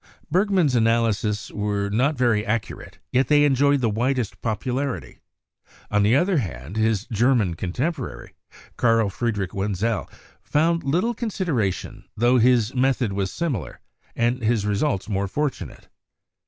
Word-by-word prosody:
Bergman's 185 -5 +2
analyses 115 -2 +1
were 105 -1 -1
not 130 +8 +2
very 120 -4 +2
accurate, 110 0 -4
yet 130 +2 +2
they 145 -1 +5
en 145 - +3
joyed 140 +1 +3
the 115 - +2
widest 120 +1 -1
popularity; 120 - -3 0.7
on 105 0 +3
the 105 +4 +4
other 175 +5 +2
hand, 80 - -4
his 110 -2 +1
Ger 120 +3 +2
man 100 -8 +1
contemporary, 125 - -4 0.4
Carl 115 -3 +2
Friedrich 105 -4 -2
Wenzel, 105 +3 -1 0.3
found 165 +3 +1
little 175 +12 +1
consideration, 175 - -2
tho 120 +3 +4
his 120 -1 +3
method 130 -4 +1
was 95 -1 -2
similar, 120 - -3 0.4
and 120 +2 0
his 110 -2 +1
re 105 - 0
sults 100 -3 -1
more 100 -1 -1
fortunate. 145 +6 -4
115 Hz, 140 wpm, -23 LUFS, 105-135 Hz, 0.7 s, they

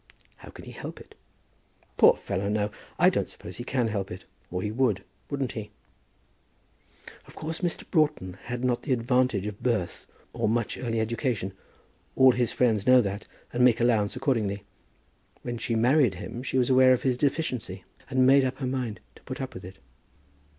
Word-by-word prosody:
How - - -13
can - - -12
he - - -9
help - - -8
it?" - - -15 0.8
"Poor - - +7
fellow, 100 0 -3
no. 105 0 0 0.3
I - - +5
don't - - -1
suppose 90 - -9
he 120 - -5
can 125 -2 0
help 100 -3 -2
it, 90 +1 -8 0.2
or 90 +1 -3
he 105 - -2
would; 110 -5 +1 0.3
wouldn't 140 -3 -2
he?" 105 -2 -6 1.6
"Of - - -15
course 160 +2 -5
Mr. 175 -2 -1
Broughton 150 - +1
had 125 0 -4
not 125 -1 +1
the 140 - 0
advantage 125 -4 +1
of 105 -1 -6
birth 115 -8 -1 0.3
or - - 0
much 115 0 0
early 115 -3 -1
education. 110 -3 -1 0.6
All 130 -1 +7
his 120 -2 0
friends 115 -4 +1
know 130 0 +8
that, 100 -1 -4 0.3
and 125 +1 +2
make 120 -2 +5
allowance 115 -4 +2
accordingly. 110 -7 -1 0.8
When 120 -1 -4
she 115 - -1
married 125 -1 +4
him, 105 +6 -6
she 130 0 -2
was 125 0 +2
aware 130 0 +7
of 125 - -1
his 130 -2 +2
deficiency, 125 - -2 0.3
and 130 -1 +3
made 135 +1 +6
up 130 0 -1
her 135 - -3
mind 125 -4 -3 0.2
to - - -19
put 130 - -7
up 130 -1 -5
with 95 - -9
it." 95 +1 -10
120 Hz, 185 wpm, -27 LUFS, 105-130 Hz, 1.6 s, know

